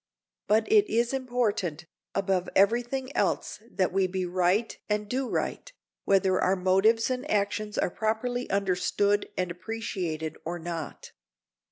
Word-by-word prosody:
But 215 +2 +3
it 420 -2 +5
is 235 +2 +1
important, 230 - -1 0.3
above 190 -2 0
every 210 +5 +5
thing, 260 +2 -5
else - - 0
that 185 -5 0
we 190 -1 +3
be 185 0 -2
right 185 +5 +1
and 210 0 0
do 255 +3 -2
right, - - -2 0.3
whether 190 -1 +3
our 185 - +3
motives 195 +6 +3
and 255 +4 -3
actions 210 +1 0
are - - +1
properly 245 +4 -1
understood 200 +1 +1
and 180 -1 -1
appreciated 175 -6 -4
or 175 +2 -3
not. 165 -2 -6
200 Hz, 140 wpm, -28 LUFS, 185-235 Hz, 0.3 s, it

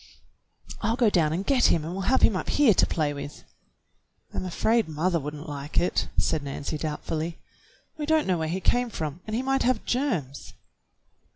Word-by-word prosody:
"I'll 225 +2 +1
go 235 -4 +3
down 160 -5 +3
and 180 +5 -2
get 265 -3 +3
him 165 - +3
and 165 - -4
we'll 195 +2 -2
have 260 - +3
him 215 - +5
up - - -3
here 285 -7 +5
to - - +4
play 150 -3 0
with." 145 0 -8 0.9
"I'm - - -3
afraid 220 +5 +1
mother 165 +3 0
would 150 +1 -5
n't 150 +2 -9
like 145 0 -2
it," 175 - +1
said 160 - +1
Nancy 140 +2 -4
doubtfully. 160 +2 -3 0.6
"We 295 - -3
don't 315 -1 +3
know 180 -3 +1
where 160 - -1
he 180 +4 -2
came 245 +4 +2
from, 160 -4 -5
and 215 - -2
he 250 - -1
might 270 0 +1
have 250 -2 +1
germs." 225 - -2
175 Hz, 195 wpm, -26 LUFS, 155-235 Hz, 0.9 s, him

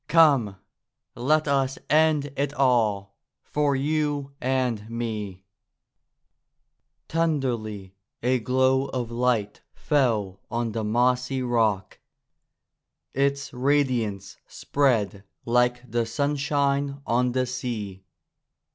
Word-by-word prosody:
Come, 140 -11 +4 0.6
let 150 +5 +1
us 135 -1 +1
end 150 -2 +3
it 145 +1 -2
all, 110 -7 +1 0.2
for 145 -2 0
you 145 0 -1
and 125 -5 -1
me 105 -5 -4 1.6
!'^ - - -53
Tenderly 120 - -1 0.3
a 125 +1 +2
glow 130 +3 +2
of 125 -3 -4
light 115 -4 0
fell 110 - 0
on 115 -1 -2
the 110 0 -3
mossy 125 +4 +1
rock. 110 -6 0 1.1
Its 140 +1 0
radiance 125 -7 0
spread 110 -8 0 0.2
like 125 +1 +2
the 120 -1 0
sunshine 140 0 0
on 125 +1 +1
the 130 0 +1
sea. 115 -7 -5
125 Hz, 95 wpm, -25 LUFS, 110-140 Hz, 1.6 s, Come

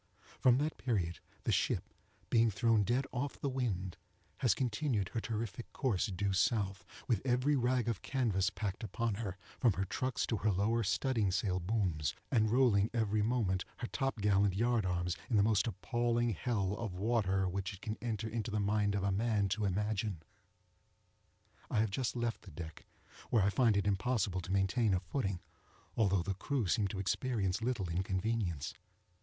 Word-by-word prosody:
From 125 -1 +5
that 150 +3 -1
period 95 -9 -1 0.2
the - - +1
ship, - - 0 0.4
being 115 -1 +5
thrown 110 +2 +3
dead 125 +6 +1
off 135 +3 -3
the - - -1
wind, 100 -9 -2 0.4
has 120 -6 +3
continued 120 -4 0
her 115 - -2
terrific 115 +1 -4
course 115 -9 +1
due 100 0 -1
south, 95 0 +1 0.2
with 115 -6 +2
every 130 +3 +2
rag 125 -2 +1
of 115 -5 -1
canvas 110 -8 +1
packed 105 0 -4
upon 110 +2 -1
her, 95 -4 -4 0.2
from 120 -5 +4
her 95 +2 -1
trucks 130 +6 -1
to 115 - -1
her 105 +1 +1
lower 105 +5 +1
studding 110 -1 +1
sail 90 -1 0
booms, 90 -6 0 0.2
and 110 -4 +3
rolling 115 -4 +4
every 110 -2 +1
moment 105 -5 +1
her - - -4
top 135 -1 -2
gallant 100 -1 +3
yard 115 -1 +2
arms 90 0 -1
into 115 - -1
the 100 - +5
most 105 0 +3
appalling 120 +3 0
hell 100 -1 -1
of 110 -6 -4
water 95 -2 +1
which 95 +1 -2
it 95 - -11
can 110 - -3
enter 110 -2 -2
into 115 +1 -3
the 105 0 -1
mind 100 0 +1
of 100 - -1
a 100 - +1
man 105 0 +1
to 105 +2 0
imagine. 100 -2 -1 1.5
I - - -1
have 110 -2 +1
just 125 +4 -1
left 120 -1 -2
the - - -12
deck, 80 0 -9 0.4
where 110 -5 +4
I 100 - +3
find 115 -3 +3
it 100 - +1
impossible 100 -2 +1
to 90 - -7
maintain 95 +2 +2
a - - +1
footing, 95 -6 -2 0.5
although 100 -5 +2
the 100 - -1
crew 125 +5 -1
seem 100 +3 +2
to 95 - -5
experience 100 0 0
little 115 -5 -1
inconvenience. 90 -2 -1
105 Hz, 175 wpm, -34 LUFS, 95-120 Hz, 1.5 s, From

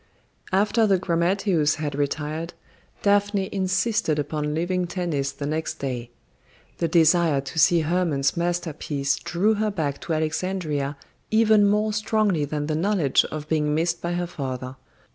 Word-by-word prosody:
After 210 +4 +3
the 195 -2 +4
grammateus 175 -2 +1
had 150 -2 -3
retired, 150 +3 -3 0.5
Daphne 205 -1 +2
insisted 195 -2 0
upon 150 0 -2
leaving 175 +2 -1
Tennis 170 -6 -2
the 145 - -6
next 155 +2 -2
day. 125 -3 -4 0.7
The 170 - +1
desire 165 -2 +4
to 140 +4 -5
see 170 +3 +5
Hermon's 155 -4 0
masterpiece 160 -5 -1
drew 200 +6 +1
her 215 0 0
back 155 -8 -3
to 165 - -3
Alexandria 155 -3 -2 0.3
even 220 -2 +4
more 210 +1 +1
strongly 210 -6 +1
than 145 0 -3
the 155 - -2
knowledge 170 -4 +2
of 155 -1 -6
being 150 -1 +1
missed 165 +1 0
by 170 0 -2
her 175 0 -1
father. 130 -5 -5
165 Hz, 145 wpm, -24 LUFS, 150-190 Hz, 0.7 s, see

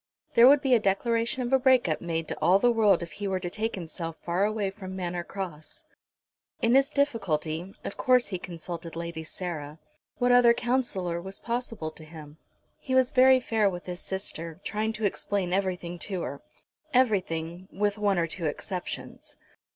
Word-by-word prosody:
There 235 +1 +8
would 280 +1 +7
be 265 -2 +3
a 240 - +6
declaration 230 +5 0
of 245 +2 -2
a 265 - +6
break 255 -4 +4
up 155 - -1
made 165 -2 -2
to - - -4
all 175 +5 +5
the 240 +4 +4
world 210 -6 +4
if 170 - -8
he 200 +5 -5
were 190 -1 0
to 175 -1 -4
take 220 +3 -2
himself 165 -2 -5
far 175 +3 0
away 210 -2 -1
from 190 -2 -8
Manor 175 -2 -3
Cross. 170 -5 -7 0.7
In 230 +1 +2
his 270 +1 +5
difficulty, 190 - -1
of - - -6
course 250 -1 +3
he 185 -3 -3
consulted 170 -1 -7
Lady 170 -1 -5
Sarah. 155 -3 -6 0.4
What 245 0 +2
other 245 -1 +6
counsellor 235 -9 -1
was 190 +2 -5
possible 230 -9 -3
to 155 - -13
him? 155 -1 -12 0.4
He 260 -2 -2
was 260 0 +4
very 260 0 +6
fair 220 -4 +2
with 175 -2 -7
his 180 -1 -5
sister, 170 -4 -4
trying 215 +1 -1
to 215 -1 -3
explain 195 -2 -1
everything 180 -2 -2
to 185 -2 -3
her 140 +2 -5 0.5
everything, 185 -7 +1
with 205 +1 -1
one 200 -2 +2
or 170 - +2
two 165 0 -3
exceptions. 180 +4 -6
190 Hz, 180 wpm, -27 LUFS, 170-230 Hz, 0.7 s, There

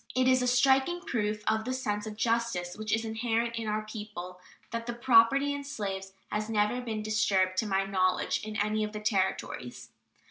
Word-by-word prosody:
It 255 0 +3
is 255 0 +4
a 250 - +1
striking 265 +7 +3
proof 210 -8 -2
of 220 0 +2
the 255 - -2
sense 210 -5 -2
of 210 -1 -7
justice 230 -7 0
which 215 0 -5
is 225 0 +1
inherent 230 +1 -1
in 225 -1 -3
our 215 0 -1
people 210 -5 -7 0.3
that 230 0 -4
the 240 - -2
property 255 +3 +5
in 285 0 -4
slaves 195 -8 -5 0.2
has 215 +1 -2
never 215 +3 +1
been 220 -3 -4
disturbed, 205 -3 +2
to 220 - +1
my 195 -1 +1
knowledge, 185 -1 +1
in 215 0 -6
any 215 +1 0
of 210 0 -4
the 210 - -4
Territories. 190 - -2
215 Hz, 190 wpm, -29 LUFS, 210-235 Hz, 0.3 s, property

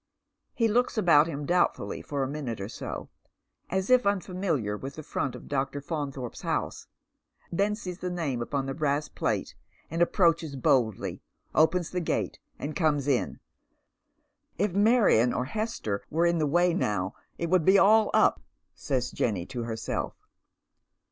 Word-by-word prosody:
He 230 - +3
looks 240 +2 +1
about 165 -6 +5
him 145 -3 -4
doubtfully 175 +3 +1
for 140 -2 -2
a - - -1
minute 135 -6 -4
or 95 - -4
so, 110 - -6 0.6
as 190 +4 -1
if 250 -5 +5
un 200 -1 +3
famihar 160 - -2
with 135 +1 -6
the 155 - -7
front 135 -2 -2
of - - -11
Dr. 140 0 -1
Faunthorpe 140 -5 -4
's - - -8
house, - - -2 0.6
then 200 +4 +1
sees 180 -5 -7
the 180 - -3
name 155 -9 -2
upon 135 +3 -2
the 135 - -3
brass 150 0 0
plate, - - -2 0.4
and 165 +1 -1
approaches 165 -4 +2
boldly, 120 -5 +1 0.3
opens 165 +2 +3
the 180 - -1
gato^ 165 - -1 0.2
and 150 +1 -5
comes 150 -3 +1
in. 135 -4 0 0.6
" - - -47
If 200 0 0
Marion 205 - +4
or 125 - -1
Hester 180 - -3
were 165 +3 +2
in 170 -1 +2
the 155 - +2
way 175 +4 +3
now 105 - -1 0.2
it 170 0 -3
would 185 -3 +4
be 190 +4 +6
all 215 +2 +6
u - - +6
P," - - -23 0.7
Jenny 100 -7 0
says - - -13
to 120 -2 -4
herself. 110 -1 -3
155 Hz, 170 wpm, -28 LUFS, 135-180 Hz, 0.7 s, be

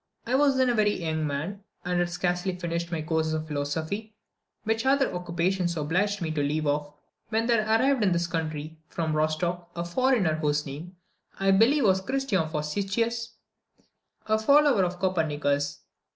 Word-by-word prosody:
I 240 - -2
was 275 0 +4
then 260 -1 +3
a - - +2
very 210 -3 +2
young 160 -2 -1
man, 165 +8 -4 0.2
and 180 0 0
had 175 0 +1
scarcely 180 +1 -1
finished 170 -1 -3
my 160 -2 -2
course 160 0 0
of 155 0 -3
philosophy, 160 +9 -3 0.5
which 225 +1 0
other 270 +1 +2
occupations 175 0 -1
obliged 185 +6 0
me 160 - -2
to 155 -2 -1
leave 150 +2 0
off, 145 0 -1 0.4
when 225 0 +1
there 230 -2 +3
arrived 250 +4 +3
in 200 -3 +3
this 170 0 +1
country, 160 -2 -4
from 160 -2 -2
Rostoch, 170 +3 -1
a 170 0 -3
foreigner, 220 -2 +2
whose 150 -1 0
name, 155 +6 -8 0.4
I 195 0 +3
believe, 235 +9 +4
was 190 -3 +3
Christian 215 -8 0
Vurstisius 205 +10 -2 0.4
(Wurteisen), - - -35 0.4
a 220 0 +2
follower 280 -2 +5
of 180 0 -4
Copernicus. 150 -6 0
175 Hz, 165 wpm, -27 LUFS, 155-220 Hz, 0.5 s, follower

